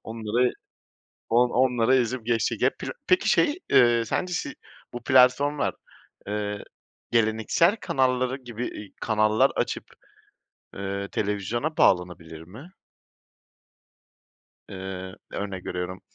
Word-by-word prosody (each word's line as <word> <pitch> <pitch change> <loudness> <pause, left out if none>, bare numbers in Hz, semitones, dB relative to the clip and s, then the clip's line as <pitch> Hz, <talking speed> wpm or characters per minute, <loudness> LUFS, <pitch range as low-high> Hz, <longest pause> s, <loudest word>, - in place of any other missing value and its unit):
onları, 115 +2 0 0.8
on 120 +2 +3
onları 125 -1 +3
ezip 125 -1 -1
geçecek. 115 -1 0
Hep - - -37
pira - - -5
Peki 370 +1 +3
şey, 310 +2 +3
eee, 120 -3 +5
sence 180 +10 -2
şey, 295 +12 -2 0.4
bu 120 -1 -7
platformlar, 130 +3 +3 0.5
ııı, 105 -1 -3 0.5
geleneksel 115 - +2
kanallar 130 - 0
gibi, 120 -2 -6
eee, 105 - -8
kanallar 110 -1 +3
açıp, - - -2 0.9
ııı, 100 0 -4
televizyona 110 - -2
bağlanabilir 85 -3 +1
mi? 110 - -12 2.0
Eee, 95 -1 -7 0.2
örnek 100 -3 -5
veriyorum, 90 +1 -4
115 Hz, 105 wpm, -25 LUFS, 100-130 Hz, 2.0 s, eee